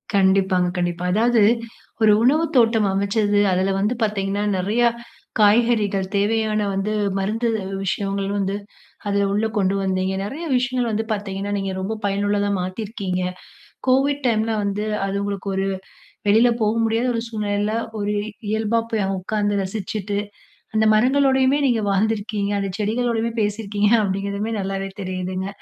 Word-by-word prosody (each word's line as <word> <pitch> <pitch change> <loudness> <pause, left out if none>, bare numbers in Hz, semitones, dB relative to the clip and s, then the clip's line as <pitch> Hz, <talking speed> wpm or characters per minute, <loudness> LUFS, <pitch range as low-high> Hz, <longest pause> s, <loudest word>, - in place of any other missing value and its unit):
கண்டிப்பாங்க, 190 -2 +3
கண்டிப்பா. 175 0 -1
அதாவது 230 +2 +3 0.6
ஒரு 215 -1 +6
உணவுத்தோட்டம் 245 -6 +3
அமைச்சது. 205 +1 +1
அதுல 185 +1 +1
வந்து 210 +4 +1
பாத்தீங்கன்னா 200 -1 -1
நெறையா, 215 +6 +2 0.5
காய்கறிகள் 210 -2 +3
தேவையான 215 +1 +1
வந்து 195 +2 -1 0.3
மருந்து 220 +5 -1 0.4
விஷயங்கள் 195 +1 -1
வந்து, 195 0 -1 0.5
அதுல 200 0 +1
உள்ள 210 +2 +1
கொண்டு 195 -1 +2
வந்தீங்க, 190 0 0
நெறைய 275 +12 -5
விஷயங்கள் 250 -1 0
வந்து 220 +1 -1
பாத்தீங்கன்னா, 200 -1 -3
நீங்க 195 -1 -2
ரொம்ப 195 +4 -2
பயனுள்ளதா 205 0 +1
மாத்தீயிருக்கீங்க. 185 0 -3 0.7
கோவிட் 275 +2 +2
டைம்ல 225 -1 +1
வந்து, 200 +1 -1 0.2
அது 195 0 -2
உங்களுக்கு 200 -1 -4
ஒரு 195 0 0 0.6
வெளில 225 +4 +5
போக 215 0 +2
முடியாத 225 +2 +1
ஒரு 230 - -1
சூழ்நிலையில, 210 -1 -1 0.3
ஒரு 205 0 -1 0.4
இயல்பா 220 +1 +1
போய் 220 -3 +1
அ - - -2
உக்காந்து 205 +1 -1
ரசிச்சுட்டு, 200 +1 -3 0.6
அந்த 220 0 +3
மரங்களோடையுமே 265 +3 +3
நீங்க 230 -4 +1
வாழ்ந்திருக்கீங்க, 205 0 0
அந்த 195 -1 -2
செடிகளோடையுமே 230 +2 0
பேசியிருக்கீங்க, 205 0 0
அப்படிங்கிறதுமே 200 +3 -2
நல்லாவே 195 0 -3
தெரியுதுங்க, 185 0 -3
205 Hz, 130 wpm, -22 LUFS, 195-225 Hz, 0.7 s, ஒரு